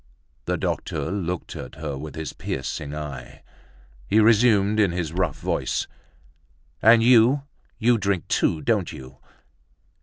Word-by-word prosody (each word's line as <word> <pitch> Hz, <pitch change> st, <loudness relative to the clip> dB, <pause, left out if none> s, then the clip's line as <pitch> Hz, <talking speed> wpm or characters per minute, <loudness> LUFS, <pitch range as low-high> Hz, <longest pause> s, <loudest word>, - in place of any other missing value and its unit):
The -, -, -1 dB
doctor 80 Hz, -, -3 dB
looked 90 Hz, -3 st, -4 dB
at 65 Hz, -, -8 dB
her 75 Hz, -2 st, -5 dB
with 75 Hz, +3 st, -8 dB
his 80 Hz, -3 st, -5 dB
piercing 70 Hz, +2 st, -5 dB
eye. 70 Hz, -4 st, -8 dB, 0.6 s
He 110 Hz, -, +3 dB
resumed 110 Hz, -2 st, +4 dB
in 100 Hz, -4 st, +3 dB
his 85 Hz, -2 st, -3 dB
rough 90 Hz, -2 st, -1 dB
voice: -, -, -1 dB, 1.0 s
"And 115 Hz, +1 st, +6 dB
you, 125 Hz, +3 st, +5 dB, 0.3 s
you 120 Hz, 0 st, +3 dB
drink 100 Hz, -3 st, -1 dB
too, 80 Hz, -2 st, +1 dB
don't -, -, 0 dB
you?" 65 Hz, 0 st, -11 dB
90 Hz, 130 wpm, -24 LUFS, 75-110 Hz, 1.0 s, And